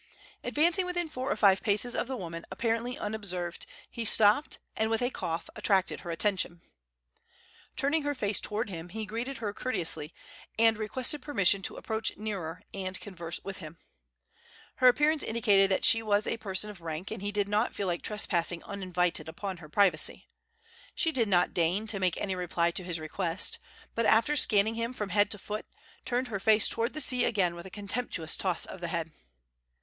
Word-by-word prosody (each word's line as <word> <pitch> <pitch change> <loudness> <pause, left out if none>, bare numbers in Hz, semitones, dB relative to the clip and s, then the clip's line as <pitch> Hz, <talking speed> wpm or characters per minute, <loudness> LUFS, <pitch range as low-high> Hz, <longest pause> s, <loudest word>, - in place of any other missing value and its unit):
Advancing 340 +5 +2
within 350 -2 -1
four 270 -2 -3
or - - +2
five 195 -2 +5
paces 220 +3 +1
of - - -1
the 260 -1 -3
woman, 170 -4 -6
apparently 230 +2 -1
unobserved, 185 -5 -3 0.2
he 235 - -5
stopped, 220 +6 +6 0.2
and 220 0 0
with 225 0 +1
a 245 +1 0
cough 165 -7 -3
attracted 195 -3 +1
her 175 - -8
attention. 175 0 0 1.2
Turning 290 +4 +1
her 290 0 -1
face 205 -5 -1
toward 210 0 -2
him, 170 0 -7
he 220 +3 -5
greeted 235 +6 -4
her 210 -3 -3
courteously, 170 -10 -1 0.5
and 225 -1 +4
requested 255 +6 +1
permission 200 -9 +2
to - - +2
approach 220 0 -3
nearer 195 -7 -5
and 190 -1 -4
converse 170 -4 -3
with 195 -1 -6
her. 160 -1 -9 1.0
Her 255 - +5
appearance 295 +4 +4
indicated 205 -4 +3
that 190 - +2
she 225 - +5
was 210 -1 +1
a 230 - -1
person 210 -1 -3
of 190 -4 -13
rank, 165 +4 -5
and 220 - -5
he 205 0 -2
did 205 -1 0
not 210 +3 +1
feel 200 - -2
like 175 -2 -1
trespassing 175 -5 0
uninvited 180 -4 -1
upon 190 +3 -5
her 155 -3 -12
privacy. 185 -2 +2 0.7
She 325 - +1
did 240 -7 +1
not 180 -3 +3
deign 175 +5 +1
to 210 -2 -1
make 185 -2 +1
any 195 - -2
reply 170 -1 0
to 185 - -2
his 175 -2 -3
request, 165 +3 -1 0.3
but, 230 -1 +1
after 230 +7 +4
scanning 215 -5 +4
him 230 +2 -2
from 210 -5 -4
head 205 0 +3
to 210 - -3
foot, 210 +2 -5 0.4
turned 250 0 -1
her 200 -3 -3
face 215 +2 +5
toward 230 +1 -1
the 305 - -1
sea 250 -3 +2
again 195 -7 +2
with 170 +2 -9
a - - -10
contemptuous 200 -4 -2
toss 185 -3 -1
of 190 - -9
the 170 - -2
head. 165 -1 -3
205 Hz, 185 wpm, -30 LUFS, 180-230 Hz, 1.2 s, stopped